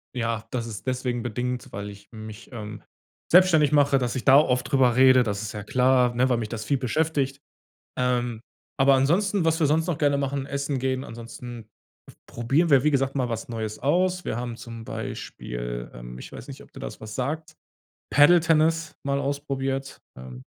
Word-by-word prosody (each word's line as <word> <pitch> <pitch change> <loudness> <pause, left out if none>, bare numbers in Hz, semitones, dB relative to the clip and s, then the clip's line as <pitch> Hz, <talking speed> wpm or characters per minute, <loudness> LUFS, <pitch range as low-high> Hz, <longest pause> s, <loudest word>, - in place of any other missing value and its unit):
Ja, 115 -2 -2
das 115 -2 -3
ist 110 +3 -8
deswegen 125 -2 -1
bedingt, 125 +2 -3
weil 105 -2 -5
ich 100 0 -13
mich, 110 -1 -10
ähm, 105 -3 -7 0.5
selbstständig 170 -5 +6
mache, 140 -1 +4
dass 125 -2 -1
ich 130 - -3
da 135 0 +7
oft 130 -3 +2
drüber 130 -3 +4
rede, 130 -1 +6
das 105 -2 -3
ist 105 - -5
ja 105 -2 -6
klar, 125 -1 +3
ne, 130 +2 +2
weil 125 - +2
mich 115 -2 -3
das 110 -2 -5
viel 135 +5 0
beschäftigt, 140 +1 -1 0.6
ähm, 125 -2 0 0.4
aber 135 +1 +5
ansonsten, 175 +8 +2
was 165 0 +2
wir 155 - +4
sonst 160 +3 +2
noch 170 -4 -2
gerne 145 -2 +2
machen, 140 -1 -2
essen 140 0 -2
gehen, 130 0 -1
ansonsten 115 -1 -9 0.6
probieren 135 +9 0
wir, 135 -3 +6
wie 150 - +4
gesagt, 135 0 +1
mal 125 -2 0
was 115 -1 -4
Neues 110 -2 -4
aus 180 +5 +1
wir - - -2
haben 120 -1 -4
zum 115 -2 -9
Beispiel, - - -6
ähm, - - -9
ich - - -10
weiß - - -9
nicht, - - -9
ob - - -20
dir - - -11
da - - -4
was 110 0 -8
sagt, 155 +5 -3 0.6
Paddle-Tennis 165 +1 +4
mal 140 0 0
ausprobiert, 135 -1 -3 0.2
ähm 65 0 -10
130 Hz, 185 wpm, -25 LUFS, 115-140 Hz, 0.6 s, da